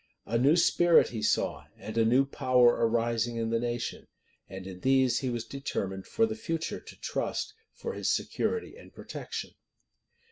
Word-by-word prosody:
A 115 - -3
new 140 +6 +5
spirit 175 0 +5
he 110 -3 -5
saw, 105 - 0
and 110 - -8
a 115 - +4
new 125 +5 +4
power 125 -2 +4 0.2
arising 115 0 0
in 115 0 -2
the 115 - +2
nation; 120 0 -3 0.4
and 95 0 -7
to 95 - -7
these 130 +6 +2
he 130 - -2
was 120 -2 -3
determined 95 -8 -4
for 225 - +2
the 220 - -3
future 165 -7 -3
to - - -14
trust 425 - -3 0.2
for 470 - -5
his - - -2
security 450 - -1
and - - -14
protection. - - -6
120 Hz, 170 wpm, -29 LUFS, 115-140 Hz, 0.4 s, new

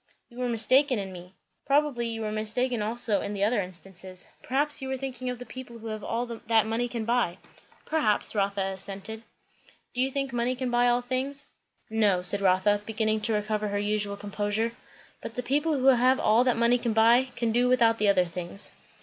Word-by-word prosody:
"You 240 0 -13
were 250 -1 -1
mistaken 255 +3 +4
in 195 -2 -5
me. 180 +1 -11 0.3
Probably 280 -4 +2
you 225 -1 -4
were 215 - -2
mistaken 220 +3 0
also 220 -1 +1
in 205 - -4
the 200 - -1
other 215 +1 +2
instances. 185 0 -6
Perhaps 290 +3 0
you 265 - -4
were 265 0 -2
thinking 255 -1 -5
of 250 - -4
the 250 - -9
people 250 -2 -9
who 225 - -13
have 215 -1 -5
all 235 +2 -2
that 225 -2 +1
money 225 +2 -1
can 235 -2 -4
buy?" 235 -7 +1 0.5
"Perhaps," 225 -10 +1
Rotha 200 -2 0
assented. 195 +3 -5 0.7
"Do 250 - -1
you 265 - +2
think 275 -1 -3
money 240 +1 0
can 250 -1 -3
buy 240 0 +3
all 245 0 +2
things?" 270 +3 -1 0.4
"No," 210 -5 +2
said 200 +3 +4
Rotha, 195 +2 +3
beginning 215 0 -1
to 225 +1 0
recover 210 0 -1
her 205 0 -2
usual 205 0 -1
composure; 205 +2 -2 0.5
"but 225 - -7
the 250 - -3
people 295 +5 +1
who 260 - -1
have 255 0 +5
all 225 +3 +4
that 250 -2 +2
money 235 +1 +3
can 235 -2 -1
buy, 230 +3 +5
can 235 -1 0
do 245 +2 +2
without 230 -3 +3
the 210 - +2
other 190 -3 +4
things." 175 +3 -4
225 Hz, 200 wpm, -27 LUFS, 205-250 Hz, 0.7 s, have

